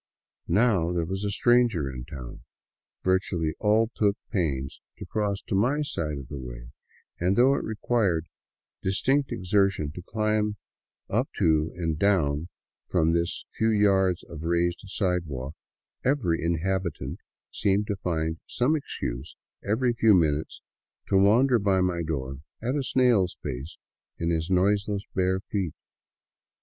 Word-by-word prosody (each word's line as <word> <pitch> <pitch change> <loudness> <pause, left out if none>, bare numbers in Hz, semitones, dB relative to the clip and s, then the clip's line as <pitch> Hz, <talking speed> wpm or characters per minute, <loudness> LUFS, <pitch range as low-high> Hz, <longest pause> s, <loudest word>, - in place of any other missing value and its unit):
Now 95 -4 +3
there 85 -2 0
was 95 +4 -3
a 105 - 0
stranger 120 - +3
in 65 -2 -6
town, 65 -3 -9 0.6
virtually 90 -4 +1
all 110 +2 +3
took 105 -1 +2
pains 70 - -2 0.2
to - - -7
cross 105 -2 -2
to - - -5
my 125 +10 +2
side 75 - -3
of 70 -2 -8
the 70 0 -6
way, - - -8 0.5
and 90 +3 +2
though 130 +4 +5
it 140 - -1
required 105 -6 0 0.6
a - - -5
distinct 135 +8 +1
exertion 95 -5 +1
to 85 - -8
climb 105 +1 0 0.5
up - - 0
to 80 -1 +2
and 80 -3 -2
down 85 -5 +2 0.4
from 80 -3 +3
this 85 0 -1
few 110 - +1
yards 95 -4 +3
of 80 -3 -9
raised 85 +1 0
sidewalk, 85 -9 -2 0.5
every 120 - +1
inhabitant 85 +1 -1 0.3
seemed 100 +1 +1
to 105 - -2
find 80 -3 -2
some 130 +6 +1
excuse 65 - -5 0.3
every 120 +4 +1
few 115 -3 +5
min 80 -4 +4
utes 80 - -10 0.5
to - - +2
wander 115 +6 +5
by 100 -2 +2
my^door 80 -7 -1 0.2
at 120 +3 -1
a 145 - 0
snail's 120 -8 +2
pace 65 +2 -5 0.4
in 85 0 -1
his 80 +1 -1
noiseless 100 +2 +2
bare 95 0 +1
feet. 95 -5 -3
95 Hz, 140 wpm, -27 LUFS, 80-105 Hz, 0.6 s, though